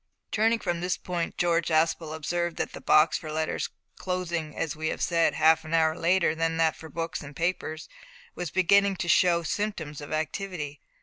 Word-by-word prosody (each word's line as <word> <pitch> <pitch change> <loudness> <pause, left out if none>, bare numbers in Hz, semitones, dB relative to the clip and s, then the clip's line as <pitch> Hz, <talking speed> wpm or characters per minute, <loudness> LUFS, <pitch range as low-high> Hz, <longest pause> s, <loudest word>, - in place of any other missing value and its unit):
Turning 225 +2 +3
from 175 -6 -2
this 180 0 0
point 175 -2 -4
George 170 -1 +2
Aspel 160 0 +1
observed 170 +2 -2
that - - -3
the - - -8
box 155 +1 +4
for 155 - -7
letters 155 0 -2 0.3
closing, 175 -4 -3
as 160 -3 -2
we 155 +1 -3
have - - -2
said, 170 -1 +2
half 160 0 +4
an 160 +1 -2
hour 160 -1 +3
later 175 -1 +2
than 165 0 -1
that 160 -1 +2
for 160 - -11
books 165 +2 -4
and 145 -1 -10
papers 165 -2 -2 0.5
was 175 -2 -4
beginning 200 +3 +4
to 175 - -4
show 170 0 +4
symptoms 160 -6 -3
of 145 - -9
activity. 155 -1 -3
165 Hz, 185 wpm, -27 LUFS, 155-180 Hz, 0.5 s, box